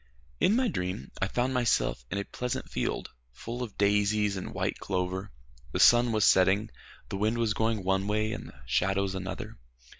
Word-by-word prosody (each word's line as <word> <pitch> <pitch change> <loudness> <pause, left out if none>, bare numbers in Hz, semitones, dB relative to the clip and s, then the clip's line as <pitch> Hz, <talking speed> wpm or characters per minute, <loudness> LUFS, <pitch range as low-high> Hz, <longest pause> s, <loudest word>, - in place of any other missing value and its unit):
In 210 - +4
my 255 +1 +2
dream 90 - -3
I 95 - +2
found 125 +5 0
myself 115 - +1
in 100 - -3
a 100 - -1
pleasant 125 -1 -4
field - - -2 0.2
full 115 - -6
of 115 -5 -6
daisies 105 0 +2
and 95 - -5
white - - -2
clover. 95 +1 -2 0.4
The - - -1
sun 120 0 +6
was 110 -2 +3
setting. 100 +4 +4 0.4
The - - -3
wind 110 +3 +1
was 115 -2 +1
going 110 -2 0
one 95 +1 +1
way, 110 +1 0
and - - -5
the - - -15
shadows 95 0 +1
another. 95 -8 -6
105 Hz, 180 wpm, -29 LUFS, 95-115 Hz, 0.4 s, sun